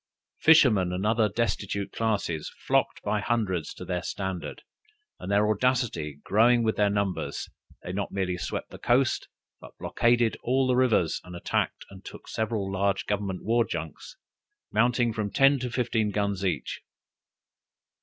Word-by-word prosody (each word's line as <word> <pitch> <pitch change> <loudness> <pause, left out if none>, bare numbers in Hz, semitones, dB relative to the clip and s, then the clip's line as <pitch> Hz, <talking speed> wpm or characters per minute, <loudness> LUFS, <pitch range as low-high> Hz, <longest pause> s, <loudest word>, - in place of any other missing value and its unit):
Fishermen 120 - +5
and 90 +3 -2
other 110 0 +3
destitute 100 -2 -2
classes 100 -8 -2
flocked - - +1
by 105 - 0
hundreds 100 -8 -1
to - - -8
their 90 -1 -2
standard, 95 -1 -5 0.6
and 95 - -5
their 105 +1 +3
audacity 110 - 0
growing 115 +3 +4
with 110 -1 +1
their 105 -1 +3
numbers, 100 -2 -2 0.4
they 90 - -5
not 100 0 -3
merely 95 -2 -1
swept 90 - -5
the - - -10
coast, 125 +2 +2 0.3
but - - -14
blockaded 120 -1 +2
all 130 +2 +2
the 130 -1 +2
rivers 120 -10 +2
and 90 -1 -10
attacked 85 - -2
and 95 -1 -12
took - - -11
several 110 -3 -2
large 100 0 0
government 100 -3 -2
war 115 +2 +3
junks, 80 -7 -7 0.5
mounting 120 +1 +2
from 105 -3 -2
ten 135 +5 +4
to 125 0 -3
fifteen 115 -3 0
guns 100 -1 -1
each. 95 -3 -2
105 Hz, 150 wpm, -27 LUFS, 95-120 Hz, 0.6 s, Fishermen